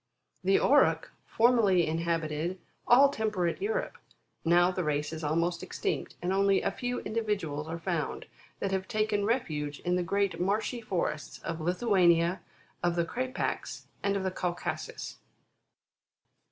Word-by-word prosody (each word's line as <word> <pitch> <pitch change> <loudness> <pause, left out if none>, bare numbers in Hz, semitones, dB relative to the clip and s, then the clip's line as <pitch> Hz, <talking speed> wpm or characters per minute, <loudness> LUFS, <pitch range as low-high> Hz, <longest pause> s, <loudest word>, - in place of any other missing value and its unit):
The 195 +1 +4
Auroch 290 +2 +3 0.2
formerly 220 -7 +4
inhabited 165 +1 -1 0.3
all 270 +4 +7
temperate 215 - -1
Europe; 445 +5 -2 0.4
now 175 +2 +4
the 185 0 -2
race 150 0 -1
is 160 0 -6
almost 170 +3 0
extinct, - - -3
and 180 +2 0
only 195 0 +3
a 200 - +1
few 245 +4 -3
individuals 195 -10 -2
are 165 +1 -4
found, 170 -2 -3 0.3
that 195 - -1
have 190 0 -1
taken 215 -3 0
refuge 150 - -1
in 180 0 +1
the - - +1
great 200 +3 0
marshy 215 +6 0
forests 170 -7 -3
of 165 - -4
Lithuania, 180 -1 +3 0.4
of 175 -1 +1
the 170 -1 +1
Krapacs, 255 +7 -3 0.2
and 200 0 +1
of 195 - -3
Caucasus. 180 -1 -4
185 Hz, 135 wpm, -29 LUFS, 165-215 Hz, 0.4 s, all